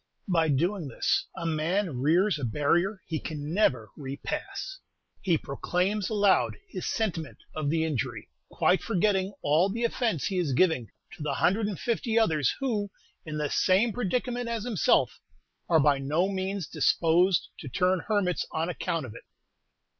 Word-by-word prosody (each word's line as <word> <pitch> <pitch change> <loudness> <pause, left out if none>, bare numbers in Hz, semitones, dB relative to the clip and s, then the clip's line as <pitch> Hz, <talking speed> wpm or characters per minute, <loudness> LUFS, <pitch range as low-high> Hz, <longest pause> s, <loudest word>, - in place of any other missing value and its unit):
By 165 -4 +2
doing 170 +4 0
this 125 - 0
a 170 - -4
man 165 -1 0
rears 165 +6 +3
a - - -6
barrier 170 - +1
he 160 -2 -3
never 145 - 0
can - - -13
repass; 140 - -5 0.4
he 175 -4 +2
proclaims 180 +8 -1
aloud 195 - +3
his 185 - -5
sentiment 170 -9 -2 0.2
of 155 -2 -1
the 160 +1 +1
injury, 145 -8 -3 0.2
quite 185 - +2
forgetting 195 -2 +1
all 160 +7 +3
the 230 +4 -3
offence 230 - 0
he 190 -2 0
is 155 -7 0
giving 160 -6 +2 0.2
to - - -12
the 145 -2 -1
hundred 195 +8 +2
and 205 -4 -4
fifty 230 -1 -1
others 155 - +3
who, 220 -7 -1 0.4
in 155 0 -4
the 150 -2 -2
same 200 +5 +3
predicament 245 +2 -1
as 230 -2 -2
himself, 225 -7 +2 0.5
are 165 - +5
by 145 -1 +3
no 150 +7 +1
means 190 -1 -2
disposed 165 +4 +2
to 140 - -7
turn 185 +4 +2
hermits 205 -5 +1
on 160 +2 -1
account 165 -3 -2
of 115 - -9
it. - - -12
175 Hz, 160 wpm, -28 LUFS, 150-205 Hz, 0.5 s, are